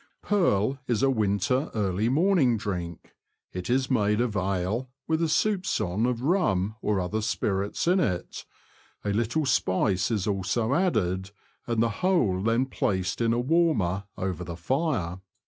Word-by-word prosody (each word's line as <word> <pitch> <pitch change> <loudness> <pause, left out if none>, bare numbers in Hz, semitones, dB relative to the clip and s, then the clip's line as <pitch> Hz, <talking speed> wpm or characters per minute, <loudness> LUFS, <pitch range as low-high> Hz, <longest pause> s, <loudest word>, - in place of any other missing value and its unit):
Purl 135 - +1
is 120 0 0
a 135 - +4
winter 110 - 0
early 105 +1 0
morning 150 - +3
drink. 90 -6 -5 0.4
It 90 +3 -5
is 130 +2 +1
made 105 -3 +2
of 120 -3 0
ale, 95 +6 -1 0.2
with 160 0 +1
a 165 - +2
soupgon 150 - 0
of 120 -1 -3
rum 110 - +1
or 105 -2 0
other 95 +4 -2
spirits 100 +3 -1
in 185 +2 +4
it; 90 - -2 0.6
a 100 - 0
little 120 +8 0
spice 95 -5 +1
is 105 -4 -1
also 105 +4 0
added, 100 - 0 0.4
and 115 -1 +1
the 115 - +1
whole 125 - +2
then 115 +5 +2
placed 95 -7 -1
in 115 -1 +2
a 120 - +1
warmer 125 - +1
over 90 -1 -3
the 85 -1 -7
fire. 100 - -1
110 Hz, 150 wpm, -27 LUFS, 95-135 Hz, 0.6 s, a